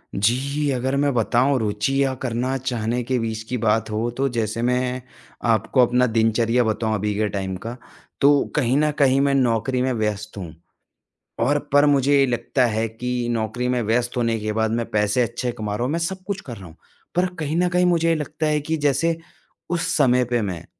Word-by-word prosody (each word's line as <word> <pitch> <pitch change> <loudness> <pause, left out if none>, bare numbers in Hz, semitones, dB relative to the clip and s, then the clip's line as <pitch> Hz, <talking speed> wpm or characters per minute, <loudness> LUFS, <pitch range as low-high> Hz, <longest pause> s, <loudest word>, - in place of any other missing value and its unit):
जी, 140 +8 0
अगर 130 +2 -1
मैं 140 -1 +1
बताऊँ, 125 +4 +2
रुचि 110 +6 0
या 135 -1 0
करना 125 +1 -2
चाहने 120 -2 -2
के 130 +1 -1
बीच 110 -1 -3
की 125 - -1
बात 110 0 +1
हो, 110 +3 -1
तो 135 +3 -1
जैसे 110 +1 -1
मैं 125 +1 0 0.5
आपको 120 +4 +3
अपना 125 +1 +2
दिनचर्या 115 +2 +2
बताऊँ 110 0 -1
अभी 105 0 -1
के 105 0 +1
टाइम 95 -2 -3
का, 120 +1 -4 0.5
तो 140 0 +5
कहीं 130 -2 +2
न 150 0 +2
कहीं 135 -1 +4
मैं 140 0 +2
नौकरी 125 0 +1
में 130 0 +1
व्यस्त 105 -1 -3
हूँ। 85 -4 -7 0.9
और 145 +2 +2
पर 145 +1 +6
मुझे 140 0 +3
ये 135 - +5
लगता 125 +1 0
है 110 0 0
कि 125 +1 -3
नौकरी 115 +2 -2
में 125 -1 +1
व्यस्त 120 +3 0
होने 115 -2 0
के 110 0 -3
बाद 110 0 0
मैं 115 0 -1
पैसे 105 +3 +1
अच्छे 120 +2 -3
कमा 105 -2 -4
रहा 120 - -2
हूँ, 130 - -1
मैं 165 - 0
सब 185 +2 -3
कुछ 195 -1 -3
कर 120 -5 -8
रहा 95 - -11
हूँ। 80 - -15 0.4
पर 180 +1 +3
कहीं 155 +1 -2
न 180 - +3
कहीं 180 0 +2
मुझे 165 -1 +3
लगता 155 +1 -3
है 150 0 +1
कि 160 +2 -2
जैसे 150 +3 +1 0.5
उस 175 -1 -1
समय 125 -3 +4
पे 120 -1 0
मैं, 90 -5 -4
125 Hz, 205 wpm, -22 LUFS, 110-140 Hz, 0.9 s, पर